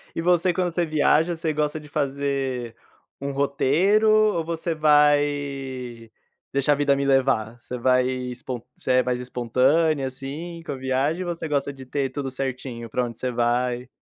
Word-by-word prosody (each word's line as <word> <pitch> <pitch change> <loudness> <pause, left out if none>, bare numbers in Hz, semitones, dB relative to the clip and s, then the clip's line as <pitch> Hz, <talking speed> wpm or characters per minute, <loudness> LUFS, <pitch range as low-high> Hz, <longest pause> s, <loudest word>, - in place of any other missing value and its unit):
E - - -1
você, 175 +1 +3
quando 180 -1 0
você 170 0 0
viaja, 155 +2 +2
você 160 -1 -2
gosta 150 +1 -1
de 150 - -13
fazer 135 -4 -2 0.4
um 140 0 -3
roteiro, 145 +10 +2
ou 215 -6 +3
você 165 0 -2
vai 145 -5 +1 0.4
deixar 140 +2 +3
a - - +1
vida 140 -1 +2
me 140 - -1
levar? 130 -5 +2
Você 125 +1 -7
vai 125 +1 +3
espon 125 -1 -4 0.2
você - - -2
é 130 - +4
mais 125 -1 -1
espontânea, 130 +5 +1
assim, 145 +6 -6
com - - -5
a - - -5
viagem, 135 +7 -1
você 170 -2 -4
gosta 140 -1 -1
de 135 - -11
ter 135 -1 -1
tudo 140 -2 -4
certinho? 130 -3 -4
Pra 125 - 0
onde 115 -1 -7
você 130 -1 -2
vai. 120 +1 0
140 Hz, 170 wpm, -24 LUFS, 125-155 Hz, 0.4 s, é